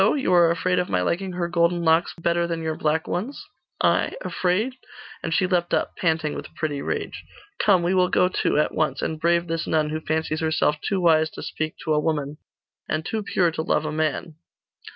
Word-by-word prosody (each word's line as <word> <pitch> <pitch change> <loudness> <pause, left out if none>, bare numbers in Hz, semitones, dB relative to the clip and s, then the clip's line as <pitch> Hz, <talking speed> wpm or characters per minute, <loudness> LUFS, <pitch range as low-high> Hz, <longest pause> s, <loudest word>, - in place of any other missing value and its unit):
You 265 -10 +1
are 170 -1 +6
afraid 180 +2 +1
of 180 - -2
my 90 -1 +1
liking 185 - -1
her 175 -1 -1
golden 170 0 +1
locks 160 +1 +3
better 170 +1 +1
than 165 -1 -3
your 160 0 -1
black 160 +2 0
ones?' 225 +11 -4 0.4
'I? - - +2
Afraid?' 190 +8 0 0.5
And 165 - -3
she 185 - +2
leapt 180 -2 +1
up, - - -2
panting 160 -3 0
with - - -8
pretty 145 -3 -2
rage. - - -4 0.4
'Come, 190 -4 +4
we 175 +2 +1
will 180 -1 +3
go 180 - +3
too 185 - 0
at 150 - +1
once 155 0 -1
and 160 -1 -2
brave 170 0 +2
this 165 -1 -3
nun, 155 -1 +1
who 155 0 -3
fancies 155 0 -1
herself 155 -2 +1
too 195 - -1
wise 160 -3 +4
to - - -9
speak 155 0 -4
to 155 - +1
a 150 - +3
woman, 150 -2 -2 0.5
and 155 0 -1
too 220 +3 -2
pure 180 -4 +1
to 160 - -3
love 155 - 0
a 155 - -2
man! 155 +1 -2
165 Hz, 210 wpm, -24 LUFS, 155-180 Hz, 0.5 s, are